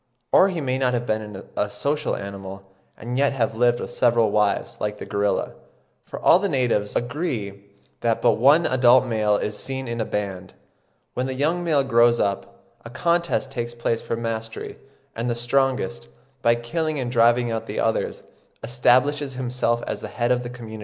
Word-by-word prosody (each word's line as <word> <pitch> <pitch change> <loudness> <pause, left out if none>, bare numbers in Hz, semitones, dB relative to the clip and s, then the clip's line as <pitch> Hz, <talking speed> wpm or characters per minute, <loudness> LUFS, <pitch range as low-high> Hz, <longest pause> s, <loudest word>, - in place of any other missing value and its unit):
Or 195 - +6
he 175 -4 -3
may 130 -1 -1
not 125 -2 +1
have 120 0 -2
been 105 -3 -3
a 105 - 0
social 145 +6 -1
animal, 100 -1 -8 0.3
and 125 +3 -4
yet 140 0 +3
have 115 -4 0
lived 120 +1 +2
with - - -6
several 115 -3 +2
wives, 105 -1 0
like 105 0 -2
the - - -7
gorilla; 100 0 -1 0.5
for - - -9
all 175 - +5
the 200 0 -1
natives 120 -7 0
"agree 120 - -3 0.3
that 115 -1 0
but 120 - +4
one 145 +7 +5
adult 130 0 +5
male 110 -3 +1
is 105 - -3
seen 130 +3 -4
in 115 0 -3
a - - -1
band; 95 -3 -4 0.6
when 125 +1 -2
the 130 - -4
young 160 +6 0
male 155 -5 +2
grows 120 -2 +4
up, 100 -1 -2 0.2
a 115 - -9
contest 170 -2 0
takes 120 -2 -4
place 115 -1 -1
for - - -3
mastery, 115 -1 -5 0.4
and 115 +2 -2
the 120 - 0
strongest, 120 - 0 0.3
by 115 0 +4
killing 155 +7 -2
and 125 -3 -3
driving 120 0 +3
out 110 -1 -3
the - - -4
others, - - -1 0.4
establishes 130 +3 +2
himself 125 -2 -1
as - - -4
the - - -5
head 120 0 -1
of 125 0 +2
the 120 - -6
community." 115 -3 -9
120 Hz, 185 wpm, -23 LUFS, 110-130 Hz, 0.6 s, Or